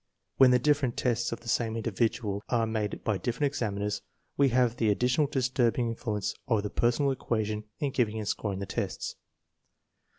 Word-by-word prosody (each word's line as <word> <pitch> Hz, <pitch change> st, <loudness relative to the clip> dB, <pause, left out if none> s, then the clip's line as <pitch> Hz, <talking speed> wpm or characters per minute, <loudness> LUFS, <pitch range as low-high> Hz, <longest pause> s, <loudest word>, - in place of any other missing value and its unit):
When 130 Hz, -1 st, +8 dB
the 125 Hz, -, +6 dB
different 140 Hz, -2 st, +1 dB
tests 120 Hz, -1 st, 0 dB
of 115 Hz, -, -5 dB
the 120 Hz, -, -14 dB
same 115 Hz, -1 st, 0 dB
individual 110 Hz, -2 st, -1 dB
are 115 Hz, -2 st, +2 dB
made 110 Hz, -2 st, -2 dB
by 105 Hz, -4 st, 0 dB
different 125 Hz, +4 st, -1 dB
examiners, 105 Hz, -3 st, -2 dB, 0.3 s
we 140 Hz, -1 st, +4 dB
have 120 Hz, -1 st, +2 dB
the 110 Hz, -3 st, +2 dB
additional 125 Hz, +7 st, +2 dB
disturbing 125 Hz, -3 st, +1 dB
influence 110 Hz, -3 st, -2 dB
of 110 Hz, -6 st, +2 dB
the 105 Hz, -, -3 dB
personal 120 Hz, +4 st, +2 dB
equation 110 Hz, -4 st, -2 dB
in 140 Hz, -2 st, 0 dB
giving 110 Hz, -4 st, 0 dB
and 105 Hz, -2 st, -4 dB
scoring 100 Hz, -2 st, -2 dB
the 100 Hz, -, -4 dB
tests. 95 Hz, -, -3 dB
115 Hz, 170 wpm, -29 LUFS, 105-125 Hz, 0.3 s, When